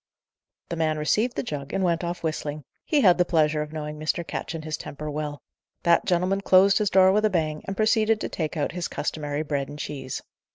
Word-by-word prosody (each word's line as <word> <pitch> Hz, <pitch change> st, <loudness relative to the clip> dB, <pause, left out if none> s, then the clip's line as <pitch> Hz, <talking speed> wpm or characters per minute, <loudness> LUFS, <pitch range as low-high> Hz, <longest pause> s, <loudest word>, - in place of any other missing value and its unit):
The 170 Hz, -, -2 dB
man 160 Hz, -1 st, 0 dB
received 215 Hz, +11 st, +1 dB
the -, -, -1 dB
jug, 145 Hz, -, -5 dB
and 195 Hz, -, 0 dB
went 170 Hz, -1 st, +1 dB
off 175 Hz, 0 st, -4 dB
whistling; 155 Hz, -2 st, -3 dB, 0.2 s
he 300 Hz, -3 st, +2 dB
had 180 Hz, -6 st, +5 dB
the -, -, +6 dB
pleasure 155 Hz, -3 st, +2 dB
of 150 Hz, 0 st, -5 dB
knowing 150 Hz, -1 st, -5 dB
Mr. 155 Hz, +2 st, -1 dB
Ketch 165 Hz, -, -4 dB
and 155 Hz, -1 st, -6 dB
his 155 Hz, -1 st, -2 dB
temper 150 Hz, +2 st, -6 dB
well. 145 Hz, -1 st, -4 dB, 0.4 s
That 170 Hz, 0 st, +4 dB
gentleman 185 Hz, +2 st, +1 dB
closed 195 Hz, +1 st, +5 dB
his 210 Hz, -2 st, +1 dB
door 190 Hz, 0 st, +6 dB
with 210 Hz, +2 st, +2 dB
a -, -, +4 dB
bang, 155 Hz, -5 st, -1 dB
and 195 Hz, -, -4 dB
proceeded 220 Hz, 0 st, +3 dB
to -, -, -1 dB
take 160 Hz, -1 st, -3 dB
out 145 Hz, -, 0 dB
his 180 Hz, 0 st, -3 dB
customary 150 Hz, 0 st, -3 dB
bread 140 Hz, -3 st, -2 dB
and 145 Hz, -, -8 dB
cheese. 135 Hz, -3 st, -5 dB
160 Hz, 220 wpm, -25 LUFS, 150-190 Hz, 0.4 s, the